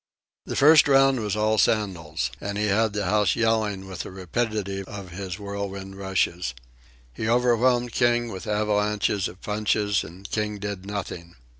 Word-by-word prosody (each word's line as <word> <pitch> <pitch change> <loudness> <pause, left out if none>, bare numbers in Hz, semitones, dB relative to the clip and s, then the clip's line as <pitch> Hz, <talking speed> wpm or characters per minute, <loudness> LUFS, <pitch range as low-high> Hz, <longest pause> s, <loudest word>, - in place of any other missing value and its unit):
The - - -3
first 150 +2 +7
round 135 -1 +5
was 105 -2 -2
all 110 0 +2
Sandel's, 90 - 0
and 100 0 -3
he 105 - +1
had 105 +1 +2
the 105 -1 -1
house 105 +2 +2
yelling 110 -4 0
with 95 -2 -8
the - - -4
rapidity 100 +1 -3
of 100 -4 -8
his 95 0 -5
whirlwind 100 -1 -5
rushes. 95 -7 -1 0.6
He 110 - -3
overwhelmed 120 0 +3
King 120 0 +2
with 95 +3 -7
avalanches 105 -1 +1
of 90 +2 -12
punches, 105 -1 0
and 90 +4 -10
King 105 -1 -1
did 100 -1 -5
nothing. 90 -4 -6
105 Hz, 155 wpm, -25 LUFS, 95-110 Hz, 0.6 s, first